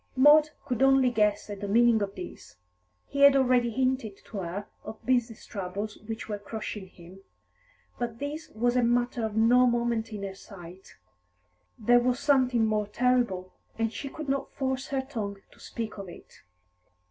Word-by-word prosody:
Maud 295 +3 +7 0.2
could 250 -4 -2
only 270 -2 +5
guess 210 -3 +1
at 205 -1 -7
the 205 - -3
meaning 230 +1 +4
of 200 -1 -3
this. - - -9 0.5
He 280 - -6
had 280 -1 +8
already 250 -3 +3
hinted 255 -4 -1
to 215 - -8
her 190 +3 -4 0.2
of 215 +1 -10
business 245 -3 0
troubles 200 +2 -5
which 225 0 -5
were 210 -1 -4
crushing 210 -1 -6
him. 180 +1 -15 0.8
But 235 -2 -3
this 300 +3 -5
was 240 +3 0
a 250 - +4
matter 240 0 +1
of 220 -1 -3
no 245 +3 +5
moment 235 -2 0
in 205 -2 -6
her 195 -1 -4
sight. 190 -2 -13 0.8
There 245 +3 +4
was 245 0 0
something 255 -5 +3
more 215 -1 0
terrible, 235 -5 0 0.2
and 225 0 -1
she 275 - -5
could 310 +1 -7
not 275 0 -2
force 265 -1 -2
her 270 -1 -1
tongue 220 -7 -5
to - - -21
speak 220 -3 -6
of 195 -2 -7
it. - - -14
230 Hz, 170 wpm, -28 LUFS, 205-255 Hz, 0.8 s, had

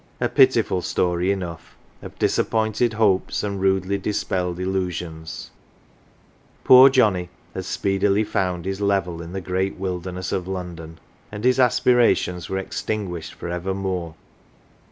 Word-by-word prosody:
A - - +1
pitiful 90 - +3
story 90 +1 0
enough 90 -4 -6 0.3
of - - -10
disappointed 110 +1 +1
hopes 105 -4 +1
and 100 -2 -3
rudely 95 0 +1
dispelled 90 -3 -2
illusions 90 -4 -4 1.1
poor 130 +1 +9
Johnnie 100 -9 +2 0.2
had 95 - -5
speedily 100 +2 +1
found 90 -4 -2
his 95 +1 -3
level 95 -4 0
in 85 0 -8
the 95 - -4
great 95 +2 -2
wilderness 90 -1 -4
of 90 -1 -2
London; 85 -4 -6 0.3
and 105 0 -7
his 125 +1 +3
aspirations 120 -8 +2
were 95 - -2
extinguished 95 -2 -4
for - - -7
evermore. 90 -1 -3
95 Hz, 125 wpm, -22 LUFS, 90-100 Hz, 1.1 s, poor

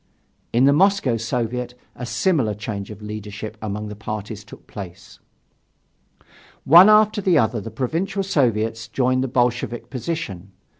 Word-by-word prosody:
In 120 +2 +3
the 140 - +5
Moscow 190 -6 +3
Soviet 120 +2 -3 0.2
a 125 - -6
similar 120 - +1
change 105 -1 -5
of 105 0 -10
leadership 105 0 -7
among 105 0 -4
the 105 - -7
parties 105 0 -6
took - - -14
place. 95 -1 -10 1.4
One 175 +8 +8
after 215 0 +5
the 185 -4 +3
other 115 -3 +1
the 115 - -7
Provincial 170 - -2
Soviets 115 - 0
joined 130 +2 +1
the - - -1
Bolshevik 120 -1 -1
position. 120 - -5
120 Hz, 140 wpm, -22 LUFS, 105-140 Hz, 1.4 s, One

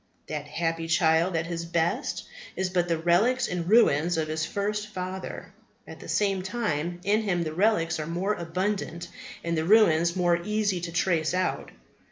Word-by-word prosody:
That 150 -1 -5
happy 165 +1 -2
child 165 +1 +3
at 165 0 0
his 170 0 -4
best 170 - -1 0.3
is 185 -1 -1
but 175 -1 +1
the 165 -1 +1
relics 210 +10 +2
and 175 -1 -3
ruins 175 -7 +4
of 155 -1 -1
his 155 +1 -2
first 210 +1 -2
father; 185 -2 -6 0.3
at - - -11
the - - -10
same 195 -2 +1
time, 175 -5 -2
in 210 +3 +2
him 180 -5 0
the 155 -1 -4
relics 175 -3 +1
are 155 - -4
more 180 +5 -1
abundant 175 -1 -3 0.3
and 170 0 -1
the 160 - 0
ruins 170 -3 +4
more 175 -2 +2
easy 210 -3 0
to 170 -1 -5
trace 170 -1 +1
out. 185 0 -1
175 Hz, 175 wpm, -27 LUFS, 165-200 Hz, 0.3 s, ruins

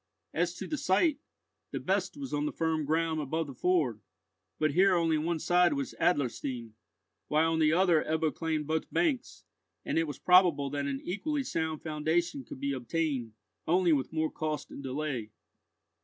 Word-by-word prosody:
As 175 +1 0
to - - -6
the 305 - -3
site, 275 - +2 0.5
the - - -4
best - - -1
was 275 -2 -6
on 145 0 0
the - - -2
firm 160 -2 -1
ground 160 +1 +1
above 160 +3 -2
the 140 - -8
ford; 145 - +1 0.6
but 155 -1 +2
here 185 +4 +4
only 165 -2 +2
one 165 +2 -1
side 175 0 +3
was 140 -2 -3
Adlerstein, 130 -7 0 0.5
while 160 +2 +2
on 160 - 0
the 155 -1 +4
other 175 -2 +4
Ebbo 160 0 0
claimed 160 -2 -2
both 160 +1 -2
banks, 300 -7 0 0.4
and - - +1
it 165 - 0
was 145 - -5
probable 175 -7 +4
that 140 -1 -2
an 135 -1 -3
equally 280 - -2
sound 160 - -2
foundation 160 -1 -1
could 130 - -10
be 140 +1 -1
obtained, 130 -2 -2 0.3
only 175 0 +4
with 135 -3 0
more 160 -1 0
cost 155 -2 -4
and - - -8
delay. 135 -4 -3
160 Hz, 175 wpm, -30 LUFS, 145-175 Hz, 0.6 s, here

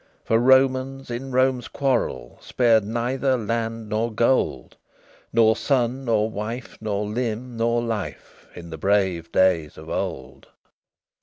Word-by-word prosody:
For 115 - +3
Romans 130 +1 +2
in 130 +3 -5
Rome's 130 -1 +1
quarrel 125 - -2
Spared 115 -4 +3
neither 125 +5 0
land 115 0 -3
nor 110 +3 -1
gold, 115 - 0 0.6
Nor 110 -1 +4
son 130 0 0
nor 110 -2 +2
wife, 115 +3 -6
nor 105 -1 -2
limb 120 +2 -3
nor 115 +1 +1
life, 115 -4 -6
In 85 -1 -10
the 80 - -7
brave 95 -3 +1
days 85 -5 +2
of - - -11
old. 65 0 -5
115 Hz, 130 wpm, -23 LUFS, 105-125 Hz, 0.6 s, Nor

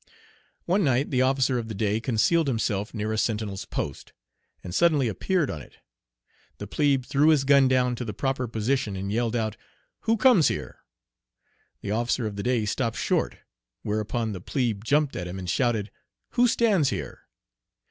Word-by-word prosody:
One 190 +3 +2
night 135 0 +1
the 130 -2 +2
officer 130 -1 +2
of 115 - -5
the 110 - -6
day 105 +1 0
concealed 130 +8 +2
himself 110 -4 -1
near 110 -1 -3
a 110 - 0
sentinel's 105 -3 -2
post, 70 - -5 0.5
and 90 - -7
suddenly 155 - +3
appeared 155 - 0
on 75 - -6
it. - - -16 0.8
The 105 - -6
plebe 135 +3 +1
threw 145 +4 +2
his 155 -4 +4
gun 140 -1 +5
down 125 -1 +2
to 125 - -4
the 110 - -4
proper 130 +4 -2
position 115 -1 -1
and 100 +1 -4
yelled 115 +1 0
out, 110 -2 -2 0.4
"Who 225 +1 +1
comes 220 - +5
here?" - - -4 1.0
The 100 - -4
officer 120 +2 0
of 105 -2 -4
the 100 - -4
day 120 -1 0
stopped 115 +2 -1
short, - - 0 0.5
whereupon 110 +2 -2
the 95 -4 -6
plebe 115 -3 -2
jumped 145 +4 +1
at 90 - -4
him 90 +2 -6
and 95 -1 -6
shouted, 110 -1 0 0.4
"Who 245 0 +3
stands 205 - +3
here?" - - -6
120 Hz, 175 wpm, -26 LUFS, 105-140 Hz, 1.0 s, gun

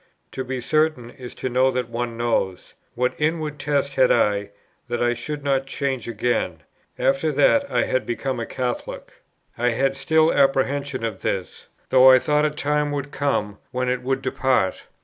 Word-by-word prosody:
To 130 - -4
be 130 0 -4
certain 155 -2 0
is 125 -2 -10
to - - -4
know 130 +1 +3
that 125 -2 -2
one 115 0 -3
knows; 115 -6 -1 0.2
what 125 +1 0
inward 155 -1 -1
test 140 -1 0
had 130 -2 +4
I, 100 -1 +2 0.4
that 120 -1 -2
I 120 0 +2
should 145 +5 -6
not 135 -1 0
change 135 -3 -3
again, 105 -8 -1 0.3
after 135 +4 +1
that 280 - +3
I - - +1
had 130 - -1
become 125 +1 -2
a 115 - -4
Catholic? 125 -2 -5 0.4
I 120 +1 +2
had 135 +3 0
still 160 +2 +3
apprehension 135 -1 +1
of 105 -4 -5
this, 95 -2 -4 0.2
though 130 0 +7
I 130 - +8
thought 150 +2 +1
a - - +3
time 150 0 -1
would 145 0 -4
come, 105 -9 -1
when 125 0 -2
it 125 0 -1
would 135 +1 -2
depart. 130 -6 0
130 Hz, 175 wpm, -23 LUFS, 120-145 Hz, 0.4 s, I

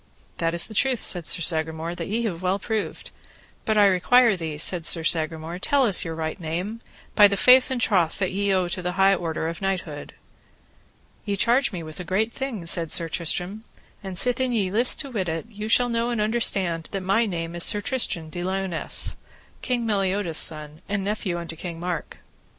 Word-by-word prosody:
That 165 0 0
is 170 - +4
truth, 255 +2 +1
said 175 -3 -1
Sir - - +4
Sagramore, 160 +1 0
that - - -6
have - - -6
we 230 +1 0
well 180 +3 -1
proved; 215 +1 -4 0.5
but 220 -1 +1
I 205 - +6
require 215 +4 +4
thee, 160 -4 -5
said 170 +3 -1
Sir 165 - +3
Sagramore, 160 +1 -1
tell 275 +6 +2
us 205 -6 +3
your 165 -2 -5
right 160 +2 -4
name, 180 +7 -4 0.3
by 205 - +7
the 200 0 -2
faith 255 +4 +6
and 260 -2 -2
troth 180 -8 +1
that 190 -2 -1
ye 200 +1 0
owe 185 -2 +1
to 185 +1 -4
the 180 0 -3
high 195 +1 +4
order 165 -3 -2
of 170 +3 -6
knighthood. 180 -6 -4 1.1
Ye 205 -2 -2
charge 240 +5 +2
me 175 -4 -6
with 155 +1 -10
a - - -4
great 210 +6 -1
thing, 255 -10 -5
said 165 -1 0
Sir 165 -1 +4
Tristram, 180 +6 -3 0.4
and 190 -2 -3
sithen 250 +4 +1
ye 200 -5 0
list 235 +5 +3
to 280 -3 -8
wit 190 -7 -2
it, 160 +3 -3
ye 210 0 -6
shall 245 +2 +3
know 235 0 -1
and 240 -2 -2
understand 195 -7 +1
that 195 -1 -3
my 220 +5 +2
name 165 -3 -4
is 175 - -4
Sir 210 - +1
Tristram 205 - -2
de 175 - -5
Liones, 190 -2 -1 0.5
King 245 -2 -1
Meliodas' 195 -5 +1
son, 155 0 -1
and 200 -1 -1
nephew 200 -3 -2
unto 170 -1 -7
King 165 0 -7
Mark. 175 -2 -4
190 Hz, 200 wpm, -24 LUFS, 165-215 Hz, 1.1 s, by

